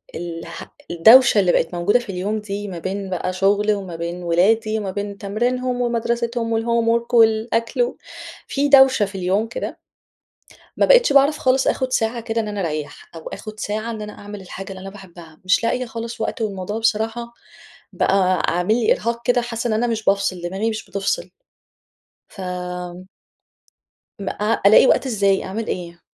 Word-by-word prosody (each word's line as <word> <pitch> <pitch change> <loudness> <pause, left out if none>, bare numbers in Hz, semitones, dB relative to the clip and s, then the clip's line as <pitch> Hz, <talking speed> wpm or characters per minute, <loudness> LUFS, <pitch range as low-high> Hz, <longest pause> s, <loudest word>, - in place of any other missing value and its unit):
الح 165 0 -7 0.2
الدوشة 225 +6 +7
اللي 185 -3 +3
بقِت 165 +1 0
موجودة 175 +8 +2
في 240 - -11
اليوم 200 +4 -2
دي 205 0 -5
ما 180 -4 -6
بين 195 +2 -4
بقى 185 0 -2
شغلي 205 +3 +2
وما 190 -4 -5
بين 170 +2 -5
أولادي 215 +6 +2
وما 200 -3 -4
بين 200 +1 -5
تمرينهم 245 +5 -1
ومدرستهم 235 -1 -1
والhomework 235 +1 0
والأكل 230 +1 +2
و 245 +1 -1 0.5
في 285 +1 0
دوشة 265 -5 +6
في 195 0 -10
اليوم 190 +4 0
كده. 230 - -6 1.0
ما - - +4
بقيتش - - +5
باعرف 280 +2 +5
خالص 260 0 +2
آخُد 260 -1 0
ساعة 230 -1 0
كده 225 0 -2
إن 215 - -5
أنا 205 -1 -4
أريَّح 155 -4 -5
أو 165 - -8
آخُد 215 0 -8
ساعة 215 +2 -3
إن 220 -2 -6
أنا 210 0 -7
أعمل 205 0 -9
الحاجة 190 +1 -9
اللي 190 -1 -9
أنا 195 - -7
باحبها، 175 -5 -14
مش 185 +5 +3
لاقية 250 +2 0
خالص 230 0 -6
وقت، 220 - -3
والموضوع 205 0 -3
بصراحة 225 +1 -1 0.6
بقى 185 -2 +2
عامل 180 +5 +1
لي 230 -1 +3
إرهاق 235 +1 -2
كده، 245 -1 +3
حاسَّة 240 0 -3
إن - - 0
أنا 220 +3 +1
مش 225 -2 -2
بافصِل، 195 -2 +1
دماغي 190 +6 -2
مش 215 -1 -5
بتفصِل. 200 - -2 1.0
ف 195 - -12 1.8
ما 200 - -3
أ 210 +2 -1
ألاقي 215 +5 +7
وقت - - +3
إزاي، 200 -5 +1
أعمل 215 +4 -4
إيه؟ 170 -1 -5
215 Hz, 170 wpm, -21 LUFS, 190-235 Hz, 1.8 s, الدوشة